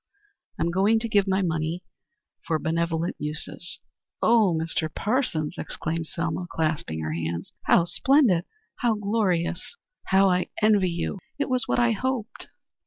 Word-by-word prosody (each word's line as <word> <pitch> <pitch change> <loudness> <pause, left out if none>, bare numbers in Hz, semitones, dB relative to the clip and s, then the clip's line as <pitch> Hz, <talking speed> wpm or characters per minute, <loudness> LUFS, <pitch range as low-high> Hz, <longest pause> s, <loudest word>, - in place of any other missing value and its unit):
I'm 170 - 0
going 200 +5 +3
to 230 - -2
give 205 -3 +2
my 190 0 +2
money 165 +1 -1 0.6
for 160 - +2
benevolent 165 +1 -1
uses." 150 +3 -5 0.4
"Oh, 220 -4 +4
Mr. 160 -1 -2
Parsons," 205 - -1
exclaimed 165 0 -3
Selma, 170 +1 -3
clasping 155 - -2
her 80 0 -3
hands, 85 +1 -4
"how 170 - +5
splendid! 235 - +3 0.3
how 235 -3 +1
glorious! 200 - -1 0.3
How 195 +1 +4
I 180 -1 +2
envy 210 -4 +4
you. 170 +3 -3 0.2
It 285 - -1
was 255 -1 0
what - - +1
I 240 -1 +4
hoped." 245 0 -3
180 Hz, 140 wpm, -25 LUFS, 160-215 Hz, 0.6 s, how